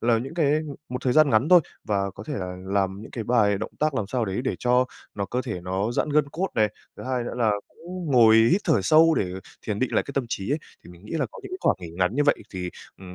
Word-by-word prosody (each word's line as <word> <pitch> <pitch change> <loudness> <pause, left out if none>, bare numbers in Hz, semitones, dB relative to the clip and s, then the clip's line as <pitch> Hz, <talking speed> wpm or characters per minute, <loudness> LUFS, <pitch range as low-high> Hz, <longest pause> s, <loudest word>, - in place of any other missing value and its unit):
là 115 -1 +3
những 135 +7 -6
cái 155 -5 +2
ừm, 155 -1 -1
một 125 - -3
thời 125 - +2
gian 155 0 +5
ngắn 115 +6 +3
thôi, 180 -1 +8 0.2
và 100 -2 0
có 95 +3 -11
thể 150 - -3
là 90 -3 -4
làm 95 0 0
những - - -11
cái 115 - -5
bài 105 -4 +3
động 110 - -5
tác 155 -1 +1
làm 110 -6 -1
sao 120 +2 -1
đấy 95 +2 -2
để - - 0
cho 125 +1 +3 0.3
nó 100 - -2
cơ 125 +6 -2
thể 110 -9 -4
nó 95 +5 -2
giãn 120 - 0
gân 150 -1 +2
cốt 185 +4 -1
này. 110 -1 +3 0.3
Thứ - - -8
hai 130 -1 -1
nữa - - -5
là 110 -2 +4 0.2
cũng 180 +1 -8
ngồi 115 -3 +7 0.2
hít 190 - +3
thở 110 - +3
sâu 160 - +5
để 90 -9 -1 0.3
thiền 105 -2 -2
định 130 - -1
lại - - +3
cái 140 - -8
tâm 135 - 0
trí 100 -2 -3
ấy, 150 - +1 0.3
thì - - -12
mình 90 +2 -16
nghĩ 105 - -9
là 165 - 0
có - - -12
những 390 - -9
cái 370 - -4
khoảng - - +2
nghỉ 85 -2 -7
ngắn 90 +5 0
như 145 +2 +2
vậy 145 - +5 0.2
thì, 90 -2 -4 0.3
ừm, 90 -1 -10
120 Hz, 290 wpm, -25 LUFS, 100-145 Hz, 0.3 s, thôi